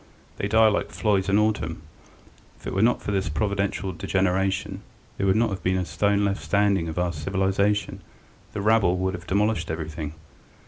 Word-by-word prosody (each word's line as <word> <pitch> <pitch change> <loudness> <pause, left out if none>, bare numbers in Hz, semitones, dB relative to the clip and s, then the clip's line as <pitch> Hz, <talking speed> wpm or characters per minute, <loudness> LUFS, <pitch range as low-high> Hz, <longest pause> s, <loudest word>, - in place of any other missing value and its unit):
They 100 - -1
die 110 +1 +5
like 105 - 0
flies 100 -3 0
in 100 - +4
autumn. 100 -8 0 0.8
If - - -18
it - - -4
were 95 - +1
not 120 +2 +2
for - - -2
this 95 -5 0
providential 100 +3 -1
degeneration 95 +2 -1 0.4
there 100 - +1
would 95 - +3
not 110 -1 +2
have 95 -2 -4
been 95 +2 +1
a 90 - -1
stone 100 +5 +1
left 100 0 -1
standing 100 -5 +1
of 80 - -6
our 90 -1 0
civilization, 95 +5 0 0.5
the 100 - -3
rabble 105 -4 +3
would 95 +1 -1
have 90 -1 -8
demolished 105 +3 +1
everything. 80 -1 -5
95 Hz, 180 wpm, -25 LUFS, 90-105 Hz, 0.8 s, die